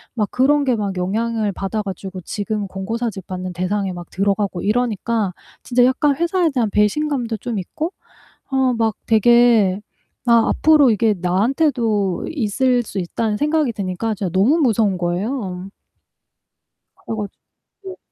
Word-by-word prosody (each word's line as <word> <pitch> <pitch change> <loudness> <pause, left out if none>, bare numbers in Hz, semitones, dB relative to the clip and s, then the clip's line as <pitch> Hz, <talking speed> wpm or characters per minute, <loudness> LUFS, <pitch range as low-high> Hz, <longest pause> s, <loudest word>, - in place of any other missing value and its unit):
막 210 -3 0
그런 285 +3 +3
게 255 -3 +2
막 200 -2 -2
영향을 215 +3 -1
받아가지고 195 -2 -4
지금 205 +2 -3
권고 195 +4 -4
사직 215 -6 -4
받는 185 -1 -5
대상에 190 +2 -2
막 175 -1 -9
들어가고 195 -1 0
이러니까 220 -2 0 0.3
진짜 245 0 +2
약간 275 +2 +2
회사에 340 +1 +1
대한 240 -5 0
배신감도 235 +2 0
좀 230 +1 -4
있고 310 - -4 0.6
아 265 -1 +2
막 225 -2 +1
되게 225 -3 +4 0.5
아 235 -1 +4
앞으로 300 -5 +5
이게 215 +1 +2
나한테도 215 - +1
있을 250 -2 +1
수 205 - -6
있다는 210 +4 -2
생각이 300 0 +1
드니까 200 +2 -3
진짜 195 -3 -3
너무 220 - +3
무서운 220 - +2
거예요. 185 +1 -3 1.4
그래 225 - -3 0.5
가지고 385 -3 -12
220 Hz, 300 characters per minute, -20 LUFS, 195-250 Hz, 1.4 s, 앞으로